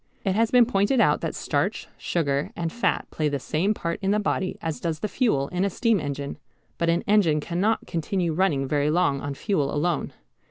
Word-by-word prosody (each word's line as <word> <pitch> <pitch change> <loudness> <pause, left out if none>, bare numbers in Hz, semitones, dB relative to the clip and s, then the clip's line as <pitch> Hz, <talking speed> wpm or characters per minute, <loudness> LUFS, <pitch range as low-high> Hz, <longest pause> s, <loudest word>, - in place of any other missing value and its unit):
It 190 - +2
has 225 +3 +2
been 245 -1 +6
pointed 225 +2 +2
out - - +3
that - - -3
starch, - - -1
sugar, 140 -4 -1
and 165 -1 -3
fat 240 - 0
play 155 -1 0
the 145 - -1
same 175 +10 0
part 170 -3 -3
in 195 - 0
the 210 +1 +3
body 190 -2 -1
as 160 -2 -4
does 160 -2 -3
the - - 0
fuel 175 - +1
in 180 +1 -1
a 200 - +2
steam 225 +2 +1
engine. 140 -1 -4 0.4
But 170 - +1
an 170 +1 +1
engine 195 -8 +3
cannot 185 +8 0
continue 170 0 -1
running 155 -6 +1
very 145 +1 +1
long 155 -4 +2
on 145 -1 -4
fuel 150 -6 0
alone. 155 +1 -1
170 Hz, 205 wpm, -25 LUFS, 150-200 Hz, 0.4 s, been